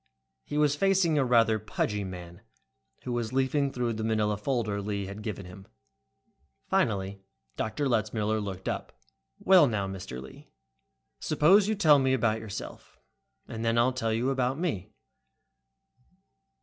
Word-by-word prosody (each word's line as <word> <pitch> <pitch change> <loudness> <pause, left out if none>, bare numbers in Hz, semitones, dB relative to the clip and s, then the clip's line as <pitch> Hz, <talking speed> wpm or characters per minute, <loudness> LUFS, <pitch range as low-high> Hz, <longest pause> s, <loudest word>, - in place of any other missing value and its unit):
He 145 - -5
was 150 -1 +3
facing 185 -3 +2
a - - +3
rather 115 -3 +3
pudgy 105 -1 -2
man, 90 -2 -9 0.6
who 125 - -4
was 120 -2 -2
leafing 135 +1 +1
through 120 -2 -1
the 110 0 -4
manila 110 -1 +1
folder 105 -2 -2
Lee 100 -1 -3
had 100 +2 -8
given 105 -3 -5
him. 95 +2 -12 1.0
Finally 100 -1 0 0.3
Dr. 110 +6 -2
Letzmiller 110 -2 0
looked 95 -2 -6
up. - - -4 0.4
"Well. 190 -1 +6
Well 145 - +6
now, 105 -5 -1
Mr. 95 -10 -7
Lee, 65 0 -12 0.7
suppose 180 +7 +4
you 220 - +1
first 205 - -8
tell 150 -4 +7
me 130 -1 +2
about 110 -3 +1
yourself, 110 -3 -8 0.5
and 115 0 -6
then 115 0 +1
I'll 125 +2 +3
tell 115 -3 -1
you 120 +4 0
about 130 0 0
me." 155 - -3
115 Hz, 150 wpm, -28 LUFS, 100-135 Hz, 1.0 s, tell